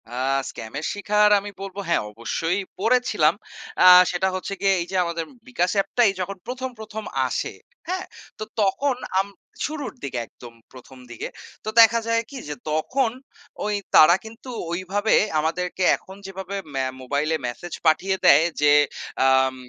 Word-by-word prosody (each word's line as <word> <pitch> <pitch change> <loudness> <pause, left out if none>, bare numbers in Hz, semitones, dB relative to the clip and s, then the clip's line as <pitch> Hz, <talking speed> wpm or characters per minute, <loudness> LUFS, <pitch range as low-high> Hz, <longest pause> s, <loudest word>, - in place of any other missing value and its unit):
আ - - -11 0.4
স্ক্যামের 135 +8 -6
শিখার 210 +1 +3
আমি 205 +1 -7
বলব 195 0 -7
হ্যাঁ 170 - +2
অবশ্যই 165 - -2 0.2
পড়েছিলাম। 250 +5 +3 0.5
আ - - +7 0.3
সেটা 180 +1 0
হচ্ছে 185 +1 -4
গিয়ে 195 -1 +4
এই - - -3
যে - - -4
আমাদের 170 -1 -3 0.2
বিকাশ 180 -8 0
অ্যাপটাই 205 +2 +3
যখন 195 +1 -4
১ম 260 +1 -4
১ম 220 0 -7 0.2
আসে। - - -3 0.3
হ্যাঁ 370 +1 -2 0.3
তো - - -3 0.2
তখন 250 +8 +1 0.2
আম 195 - 0 0.4
শুরুর 300 -1 -5
দিকে 130 -3 -3
একদম 120 -1 -14 0.2
১ম 130 +1 -14
দিকে। 120 - -6 0.3
তো - - -3
দেখা 230 0 +7
যায় 230 0 +2
কি 280 - -8
যে 150 - -4 0.2
তখন 230 - 0 0.5
ওই 210 - 0 0.2
তারা 165 +3 +8
কিন্তু 225 +4 -11 0.2
ঐভাবে 190 +5 0 0.2
আমাদেরকে 180 +4 -2
এখন 190 - -13
যেভাবে 190 0 -6 0.2
ম্যা 135 -1 0 0.2
মোবাইলে 145 +5 0
মেসেজ 165 +8 -7
পাঠিয়ে 180 +5 +3
দেয় 150 +3 +7 0.2
যে 145 0 +5 0.6
আম 130 0 +3
190 Hz, 150 wpm, -23 LUFS, 155-220 Hz, 0.6 s, তারা